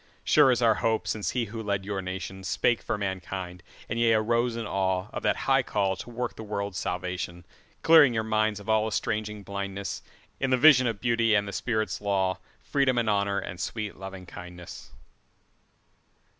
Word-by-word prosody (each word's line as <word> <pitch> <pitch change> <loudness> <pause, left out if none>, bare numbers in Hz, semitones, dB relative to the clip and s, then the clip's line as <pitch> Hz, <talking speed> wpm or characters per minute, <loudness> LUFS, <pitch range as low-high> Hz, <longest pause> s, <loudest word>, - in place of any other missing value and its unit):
Sure - - +5
is 125 -1 +2
our 115 -1 +6
hope 110 -1 0
since 105 -2 -1
he 125 -2 -1
who 110 +2 -6
led 100 -2 -2
your 100 -1 -3
nationSpake 95 +5 -1
for - - -2
mankind, 95 -2 -4 0.3
and 115 - -3
ye 115 -1 +4
arose 115 +2 +1
in 115 -1 -4
aweOf 95 +3 -1
that - - +2
high 135 0 +4
call 100 -5 0
to 95 - -9
work 120 +1 -4
the - - -8
world's 100 -2 -3
salvation; 90 -1 -4 0.4
Clearing 160 -5 +7
your 110 -2 -1
minds 110 -1 0
of 100 - -13
all 110 0 +2
estranging 105 -1 -2
blindnessIn 100 0 -4 0.4
the 130 -1 +2
vision 130 -3 +7
of 110 -3 -3
Beauty 115 -2 +2
and 100 0 +1
the 100 - -6
Spirit's 110 -5 -2
law, 95 -2 0 0.2
Freedom 135 -3 +1
and 115 -3 +2
Honour 100 -1 +1
and 95 -2 -5
sweet 105 +3 -3
Lovingkindness. 90 -2 -9
105 Hz, 170 wpm, -27 LUFS, 95-115 Hz, 0.4 s, Clearing